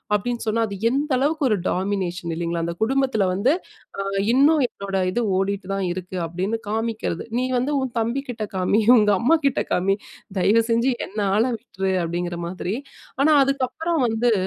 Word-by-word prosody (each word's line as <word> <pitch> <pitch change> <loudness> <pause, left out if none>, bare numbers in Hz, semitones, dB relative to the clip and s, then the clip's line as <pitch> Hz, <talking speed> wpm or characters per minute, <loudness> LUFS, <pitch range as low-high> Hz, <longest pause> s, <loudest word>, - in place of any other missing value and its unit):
அப்பிடின்னு 235 +4 -2
சொன்னா, 225 +1 +2
அது 200 -1 -6
எந்த 285 +4 -1
அளவுக்கு 295 +2 +1
ஒரு 210 - +2
டாமினேஷன் 185 -3 -2
இல்லேங்களா! 170 0 -2
அந்த 170 0 -3
குடும்பத்துல 260 -4 +1
வந்து 215 +10 +2 0.5
அ - - 0 0.3
இன்னும் 285 +3 +5
என்னோட 195 -1 -4
இது 240 +5 0 0.2
ஓடிட்டு 195 0 -2
தான் 195 -1 -1
இருக்கு. 185 0 -6
அப்பிடீன்னு 190 +7 -2
காமிக்கிறது, 220 -5 -2
நீ 255 - 0
வந்து 260 +4 0
உன் 255 -2 -4
தம்பி 235 +5 -1
கிட்ட 225 -3 -3
காமி, 190 +4 +2 0.2
உங்க 210 -2 +4
அம்மாகிட்ட 280 0 +2
காமி, 195 +2 +2 0.4
தயவு 220 +5 +4
செஞ்சு 235 +3 +3 0.2
என்ன 210 +3 -6 0.2
ஆல 225 - +4
விட்ரு! 190 -1 -3
அப்பிடிங்கிற 175 +1 -3
மாதிரி. 185 +2 -3 0.5
ஆனா 310 +2 +5
அதுக்கப்புறம் 275 +4 -1
வந்து 230 +2 +1
220 Hz, 160 wpm, -23 LUFS, 190-255 Hz, 0.5 s, இன்னும்